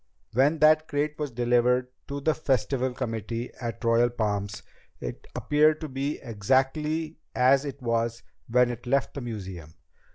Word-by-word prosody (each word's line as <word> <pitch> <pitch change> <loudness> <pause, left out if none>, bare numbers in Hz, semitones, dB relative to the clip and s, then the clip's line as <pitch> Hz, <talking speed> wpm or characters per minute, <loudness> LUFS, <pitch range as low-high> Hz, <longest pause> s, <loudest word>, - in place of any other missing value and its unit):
"When 140 +7 +3
that 155 0 +5
crate 150 +1 -1
was 150 -1 -1
delivered 125 +1 +2 0.2
to 140 0 -4
the 155 +2 +2
Festival 130 -2 0
committee 115 -1 -4
at 115 -4 -4
the 115 - -2
Royal 115 +1 +4
Palms, 105 -3 -2 0.4
it - - -7
appeared 150 +1 +3
to 155 - -3
be 140 +2 -2
exactly 135 +8 0 0.2
as 135 +3 +4
it 140 -1 -6
was 115 0 0 0.2
when 125 +1 +3
it 120 +1 -8
left 135 +1 +1
the 140 - -5
museum. 95 -9 -7
125 Hz, 155 wpm, -27 LUFS, 115-145 Hz, 0.4 s, that